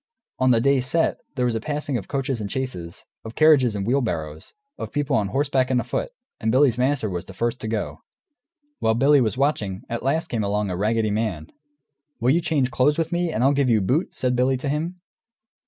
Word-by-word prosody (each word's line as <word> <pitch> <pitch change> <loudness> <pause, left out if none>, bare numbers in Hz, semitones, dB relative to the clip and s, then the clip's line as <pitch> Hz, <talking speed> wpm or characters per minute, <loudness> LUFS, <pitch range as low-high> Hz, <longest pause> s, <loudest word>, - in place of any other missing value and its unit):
On 130 - +3
the 120 -2 +4
day 140 +2 +3
set, 160 +6 0 0.2
there 125 -2 0
was 120 -2 0
passing 145 +2 -3
of 110 - -3
coaches 135 -4 -2
and 100 - -4
chaises, 95 -11 -5 0.2
of 110 0 -9
carriages 145 -8 +5
and 100 -1 -2
wheelbarrows, 85 - -2 0.4
people 145 -2 0
on 105 -3 +1
horseback 135 +1 +1
and 130 -1 +2
afoot, - - -2 0.3
and 110 - 0
Billy's 130 -1 +4
master 130 -2 +1
was 90 -3 -4
the 95 - -12
first 120 +3 -2
to - - -4
go. 110 -1 -3 0.8
While 110 0 +2
Billy 140 +3 +5
was 115 +1 0
watching, 105 -9 -1
at 115 0 -3
last 145 +6 0
came 115 -3 -1
along 100 -1 -1
a - - -2
raggedy 110 +3 0
man. 105 -8 -2 0.7
"Will 120 +3 +3
you 170 +4 +3
change 140 -6 0
clothes 145 +3 +2
with 165 0 -1
me, 175 -1 0
and 120 - -1
I'll 135 +2 +4
give 140 -2 +1
you 110 -2 +4
boot?" 130 - 0
said 125 -1 0
Billy 130 +2 +2
to 135 +2 -4
him. 165 +5 -3
125 Hz, 205 wpm, -23 LUFS, 110-140 Hz, 0.8 s, carriages